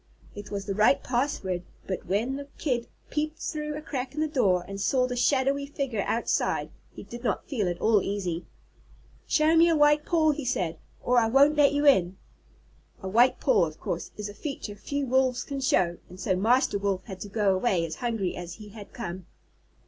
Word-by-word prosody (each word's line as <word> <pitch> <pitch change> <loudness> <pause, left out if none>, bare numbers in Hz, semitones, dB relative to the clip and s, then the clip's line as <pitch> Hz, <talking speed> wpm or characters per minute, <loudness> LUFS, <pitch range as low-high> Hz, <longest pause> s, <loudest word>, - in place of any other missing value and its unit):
It 205 -1 -9
was 200 -1 -4
the 200 - -2
right 195 -2 +3
password, 240 -8 -1 0.2
but 190 - -4
when 225 +8 0
the 285 0 -7
Kid 245 -5 -1 0.2
peeped 305 +1 -2
through 300 -2 -4
a 305 - -6
crack 265 -3 -4
in - - -3
the 310 - +1
door 195 - +1
and 195 0 -6
saw 255 +5 +2
the 250 0 -3
shadowy 275 +2 +1
figure 270 -7 -2
outside, 235 - 0 0.2
he - - -10
did 240 +1 -9
not 240 - -1
feel 215 -10 -1
at 175 - -4
all 220 -2 +3
easy. 185 -4 -3 0.8
"Show 310 +1 +3
me 335 +1 +6
a 330 - +3
white 295 0 +4
paw," 315 -2 +3
he 295 0 -4
said, 180 -10 -1 0.2
"or 245 0 +4
I 225 - +2
won't 280 +5 +5
let 290 -1 +4
you 290 +1 +1
in." 190 -10 +4 0.9
A - - -3
white 235 +6 +4
paw, 220 -10 +3
of 155 0 -11
course, 170 - -4
is 210 -1 -4
a 205 - -8
feature 235 -2 -6
few 280 +7 -3
Wolves 260 -1 +1
can 280 -1 -5
show, 175 -9 +2
and 180 +1 -12
so 185 0 0
Master 220 +2 +2
Wolf 195 -2 -1
had 190 -4 -9
to 205 - -7
go 200 -1 +2
away 185 -3 +1
as 160 -1 -6
hungry 225 -7 -2
as 175 -1 -7
he 210 -1 -11
had 205 -1 -12
come. 185 -6 -6
235 Hz, 205 wpm, -27 LUFS, 195-280 Hz, 0.9 s, me